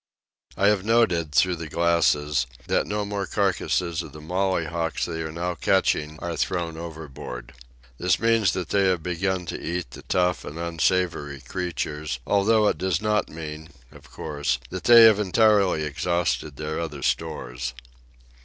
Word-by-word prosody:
I 100 - +2
have 105 -3 +1
noted, 95 -8 +2
through 90 +3 +3
the 80 -1 -6
glasses, 75 -5 +2 0.2
that - - +1
no 105 0 -2
more 100 -2 -3
carcasses 90 -4 0
of 80 -4 -10
the 75 - -10
mollyhawks 85 -1 -1
they 80 -1 -4
are 80 -1 -4
now 85 +2 -2
catching 75 -2 +1
are 85 -1 -3
thrown 85 -2 -2
overboard. 75 -7 -8 0.5
This 90 -1 +2
means 115 -2 +3
that 90 -4 -3
they 100 -1 +2
have 90 -4 +1
begun 90 +1 -1
to - - -5
eat 85 -5 -3
the - - -10
tough 90 0 0
and 75 - -8
unsavoury 85 -4 -1
creatures, 75 -2 -4
although 105 +2 +3
it - - 0
does 95 -3 0
not 105 0 0
mean, 80 0 -8 0.2
of - - -16
course, 75 -4 -2
that 95 0 -6
they 120 -1 +9
have 110 -2 +7
entirely 100 -4 +3
exhausted 75 -2 -1
their 75 +2 -4
other 75 -5 -5
stores. - - -2
85 Hz, 155 wpm, -25 LUFS, 75-95 Hz, 0.5 s, they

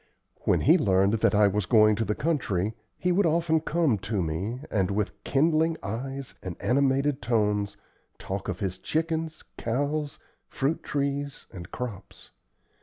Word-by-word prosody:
When - - +3
he - - +5
learned 95 +1 +3
that 105 - +3
I 105 0 +6
was 100 -1 -1
going 110 -1 +5
to 115 - 0
the 105 - -1
country, 110 - 0 0.2
he 180 - 0
would 185 0 +3
often 160 0 +2
come 155 -8 +1
to 100 0 -1
me, 95 +11 -3
and, 95 -3 +1
with 100 0 -1
kindling 160 +3 +2
eyes 135 +6 -5
and 90 -3 -5
animated 135 +4 +2
tones, 105 -3 0 0.4
talk 95 0 -5
of - - -4
his 95 -2 -2
chickens, 160 0 -2 0.2
cows, 145 +5 -1 0.3
fruit 140 +4 -1
trees 140 0 -2
and 90 -1 -8
crops. 120 -7 -7
120 Hz, 150 wpm, -27 LUFS, 100-150 Hz, 0.4 s, I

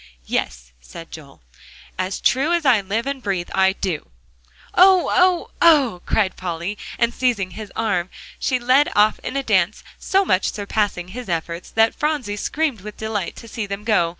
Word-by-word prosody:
"Yes," - - -3
said 115 - -11
Joel, 140 - -12 0.5
"as 185 +1 -3
true 280 +6 +2
as 340 -3 0
I 245 -6 +5
live 210 +5 -2
and 275 -1 -3
breathe, 190 -5 -3
I 190 0 +3
do!" 180 -6 -4 0.6
"Oh! 370 0 +5
oh! 365 -1 +3
oh!" 275 - +5
cried 200 -4 +1
Polly, 175 +2 -4 0.2
and 235 0 +1
seizing 230 -8 0
his 215 -1 -8
arm, 200 -5 0 0.3
she 255 - +1
led 255 +4 +3
off 210 +1 +4
in 275 - -4
a 275 - -1
dance, 195 -4 +1 0.2
so 390 +1 +2
much 185 - +1
surpassing 205 -3 -2
his 240 +2 -8
efforts, 170 +1 -3
that 225 0 +3
Phronsie 295 -9 -1
screamed 280 +1 -1
with 210 +1 -9
delight 215 -4 -3
to 230 - -11
see 220 -1 -5
them 200 +1 -5
go. 210 -6 +2
210 Hz, 175 wpm, -21 LUFS, 185-255 Hz, 0.6 s, I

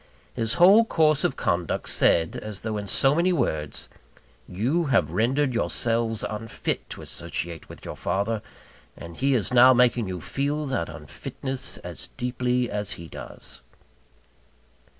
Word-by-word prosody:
His 115 +1 -1
whole 195 +6 +7
course 155 -8 +2
of - - +1
conduct 85 -1 -1
said, 80 -1 +3
as 105 -2 -6
though 110 -1 -2
in 100 -1 -5
so 135 +7 +4
many 170 +4 +2
words 80 - -1 0.6
You 130 - 0
have 115 - +2
rendered 130 - +1
yourselves 115 -1 0
unfit 110 +1 -4
to - - -7
associate 85 -2 -5
with - - -12
your - - -6
father; 100 +5 -1 0.6
and 85 0 -9
he 135 0 +2
is 115 0 +1
now 125 +1 +8
making 120 -3 +3
you 90 -1 -4
feel 145 - -2
that 130 -12 -2
unfitness 130 -1 -5
as - - -7
deeply 125 0 0
as 105 -2 -3
he 85 - -9
does. - - -10
120 Hz, 145 wpm, -25 LUFS, 100-135 Hz, 0.6 s, now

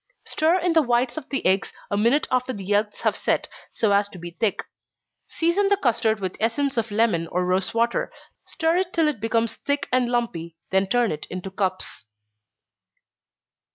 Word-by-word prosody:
Stir 320 +3 +2
in 355 -2 +1
the 325 - +5
whites 240 -2 +1
of 310 -4 -7
the 275 - -2
eggs 190 +1 +2 0.2
a - - +1
minute 235 +8 +3
after 255 0 +1
the 200 - -7
yelks 205 +1 0
have - - +1
set, - - 0 0.2
so 220 -3 +1
as 200 0 +3
to 190 - -11
be 175 0 -8
thick. 200 +4 -1 0.6
Season 345 +5 +1
the 405 - +4
custard 225 - +1
with 185 -2 -3
essence 270 +5 0
of 230 -1 0
lemon 205 -6 +1
or 180 +2 -1
rosewater 195 +6 0 0.4
stir 330 -1 +1
it 370 -1 -1
till 325 -2 +3
it 300 -7 -1
becomes 225 +1 0
thick 285 0 -1
and 250 -1 +2
lumpy, 170 -10 -2
then 190 0 +2
turn 240 +2 +2
it 150 - -5
into 185 +1 -6
cups. 185 - -3
230 Hz, 180 wpm, -24 LUFS, 195-275 Hz, 0.6 s, the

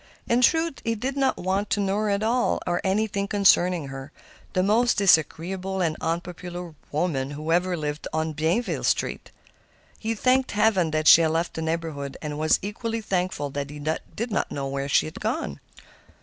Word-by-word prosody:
In 235 +1 +3
truth, 325 +4 +2
he 230 0 0
did 260 +5 -3
not 270 -1 +1
want 195 +3 -1
to 205 - +1
know 195 0 0
her 215 0 0
at 200 +1 0
all, 240 +2 +1
or 175 0 0
anything 200 0 0
concerning 180 -6 +3
her—the 135 +6 -6
most 230 +5 +3
disagreeable 190 +1 +2
and 165 -4 +1
unpopular 175 +1 -4 0.2
woman 145 -4 -1
who 155 +3 -4
ever 180 +1 +2
lived 150 -1 -4
in 160 0 -1
Bienville 165 +10 0
Street. - - -1 0.7
He 225 +1 -2
thanked 255 +4 +2
heaven 205 -6 +2
she 165 - +9
had 160 - +2
left 165 +2 -1
the 160 - -4
neighborhood, 160 -4 -3
and 150 -1 -5
was 155 0 +3
equally 225 +2 -3
thankful 180 -8 -2
that 140 0 -4
he 150 - -8
did 160 +9 -4
not 200 - -1
know 140 -1 -3
where 135 +1 -3
she 105 - +3
had 80 - -8
gone. 70 - -3
180 Hz, 175 wpm, -25 LUFS, 155-210 Hz, 0.7 s, she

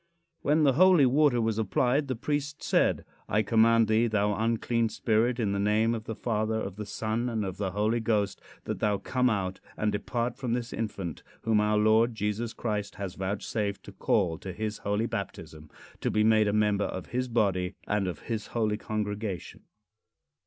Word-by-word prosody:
When 150 +2 +3
the 140 -2 +5
holy 180 -1 +6
water 135 -1 +4
was 110 -1 0
applied 125 +7 +1
the 130 - -2
priest 145 +3 -3
said: - - +2 0.2
"I 105 +2 +2
command 115 +1 +4
thee, 110 +2 +3
thou 105 -2 +1
unclean 115 +1 0
spirit, 115 +2 +1
in 105 -4 +1
the 100 - -1
name 105 +3 +2
of 110 -1 -5
the 115 - -4
Father, 110 -1 -1
of 95 -3 -5
the 105 0 -6
Son, 115 +4 -2
and 110 -3 -1
of 95 -1 -5
the 100 -2 -1
Holy 105 +3 +1
Ghost, 105 -4 0 0.2
that - - -4
thou 105 -1 +1
come 125 +4 +1
out 95 -4 -2 0.2
and 105 0 +1
depart 120 +4 -2
from 125 -4 -2
this 120 0 -3
infant, 95 -8 -4 0.2
whom 110 -2 +3
our 105 0 +2
Lord 110 +2 +4
Jesus 105 +2 -2
Christ 105 -4 -3
has 95 -3 -5
vouchsafed 100 +2 -3
to - - -10
call 80 -1 0
to 95 - -6
his 105 +2 -4
holy 105 +2 0
baptism, 75 -8 -6 0.3
to - - -1
be 105 - +2
made 110 -1 +4
a - - +2
member 105 -1 +2
of 95 - -5
his 125 +1 -1
body, 100 -5 0
and 105 -2 0
of 85 -5 -5
his 110 -3 -4
holy 110 -3 0
congregation." 105 -3 -4
110 Hz, 190 wpm, -28 LUFS, 105-115 Hz, 0.3 s, holy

